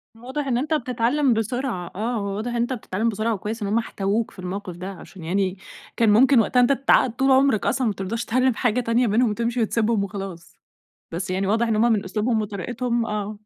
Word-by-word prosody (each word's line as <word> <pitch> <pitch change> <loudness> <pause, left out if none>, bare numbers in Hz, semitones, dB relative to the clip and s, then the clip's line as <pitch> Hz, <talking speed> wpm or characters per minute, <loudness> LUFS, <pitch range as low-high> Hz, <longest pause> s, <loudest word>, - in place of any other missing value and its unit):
واضح 260 +5 -5
إن 245 -3 +1
أنت 300 +5 -1
بتتعلم 250 0 +1
بسرعة 225 -4 -2
آه، 230 +5 -2
هو 200 -2 -2
واضح 220 +4 -3
إن - - -4
أنت 240 +2 0
بتتعلم 220 -1 -2
بسرعة 220 +2 -1
وكويس 215 +3 -5
إن 205 - -1
هُم 210 +3 +1
احتووك 215 -1 -1
في - - -16
الموقف 185 0 -5
ده، 185 +2 -6
عشان 185 -1 -12
يعني 185 +3 -1 0.4
كان 225 -2 +4
ممكن 255 +4 +6
وقتها 240 +3 +2
أنت 245 +2 +4
تتعقد 270 -2 +3
طول 270 0 +2
عمرك 265 -4 +3
أصلًا 255 -3 +1
ما 210 - 0
ترضاش 205 +5 -4
تتعلم 255 +1 +2
حاجة 245 0 +1
تانية 235 +1 +2
بينهم 225 +3 +3
وتمشي 235 +3 -1
وتسبهم 225 -1 +1
وخلاص، 195 -4 -7 0.6
بس 175 +3 -4
يعني 190 +1 -1
واضح 225 +3 +2
إن 225 - +1
هُم 230 +2 +3
من 210 -3 +1
أسلوبهم 220 +4 0
وطريقتهم 235 +4 -2
آه. 210 -1 -3
225 Hz, 210 wpm, -23 LUFS, 200-245 Hz, 0.6 s, ممكن